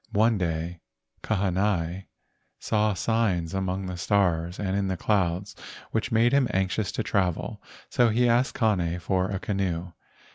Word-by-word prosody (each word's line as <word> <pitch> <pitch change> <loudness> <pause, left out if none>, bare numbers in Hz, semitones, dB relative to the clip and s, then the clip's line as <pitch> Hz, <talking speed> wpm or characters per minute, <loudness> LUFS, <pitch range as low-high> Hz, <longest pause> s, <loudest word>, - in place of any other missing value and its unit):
One 110 0 +3
day 85 0 -2 0.4
Kahanai 95 -3 0 0.5
saw 105 -1 +1
signs 95 -6 0
among 95 0 -2
the 90 -1 -5
stars 90 -3 +1
and 95 -2 -1
in 100 -1 0
the 95 -1 -2
clouds 95 0 0 0.4
which 110 +2 -1
made 115 +3 +3
him 140 -2 +4
anxious 95 +2 0
to - - -1
travel, 95 -5 -1 0.3
so 120 -1 +3
he 120 +3 +3
asked 120 +2 +2
Kane 90 -8 +1
for 95 +2 0
a 100 - -2
canoe. 90 -3 -2
95 Hz, 145 wpm, -26 LUFS, 90-110 Hz, 0.5 s, him